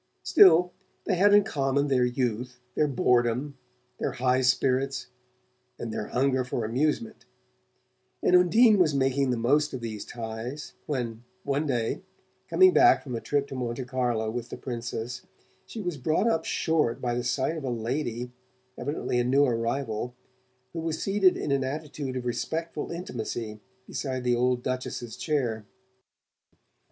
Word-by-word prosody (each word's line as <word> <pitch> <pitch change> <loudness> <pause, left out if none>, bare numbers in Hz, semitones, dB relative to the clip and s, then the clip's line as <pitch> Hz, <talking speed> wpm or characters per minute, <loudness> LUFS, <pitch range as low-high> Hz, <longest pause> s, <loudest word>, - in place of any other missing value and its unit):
Still, 180 -1 +6 0.3
they 200 - 0
had 195 +3 +4
in 205 0 +7
common 140 -7 0
their 130 -3 +2
youth, 125 0 -2
their 150 - +2
boredom, 125 +1 +1 0.4
their - - -1
high 125 +1 +2
spirits 130 +1 +1 0.7
and 115 -2 -5
their 105 - -3
hunger 130 0 +1
for 125 -2 -3
amusement; 125 +1 -1 1.0
and 180 - +5
Undine 205 +5 +6
was 155 -5 +3
making 135 0 +1
the 125 - +1
most 145 +5 +2
of 125 - -6
these 110 -3 -5
ties 115 +5 -6
when 120 -5 -3 0.2
one 140 +2 -1
day, 120 -4 -1 0.5
coming 375 -1 +6
back 360 0 +6
from 130 - -6
a 115 - -3
trip 145 -1 0
to - - -7
Monte 125 0 -3
Carlo 120 -4 -1
with 120 0 -5
the - - -6
Princess, 120 0 -5 0.5
she 225 - -7
was 175 -6 -3
brought 155 - +1
up 165 -8 +1
short 155 -7 +1
by 120 -1 -1
the 120 0 -1
sight 135 +6 0
of 155 - -6
a 130 - -2
lady 120 +1 -3 0.5
evidently 125 -1 -1
a - - +2
new 135 +4 +4
arrival 120 -1 -2 0.6
who 165 - -4
was 160 -1 -2
seated 195 -2 +3
in 145 - -3
an 135 -1 +2
attitude 140 -1 -4
of 125 -1 -4
respectful 160 +7 -3
intimacy 115 - -5 0.3
beside 130 -2 -4
the 125 -1 +2
old 125 0 +1
Duchess's 125 -2 -4
chair. 120 -9 -2
130 Hz, 155 wpm, -27 LUFS, 120-150 Hz, 1.0 s, in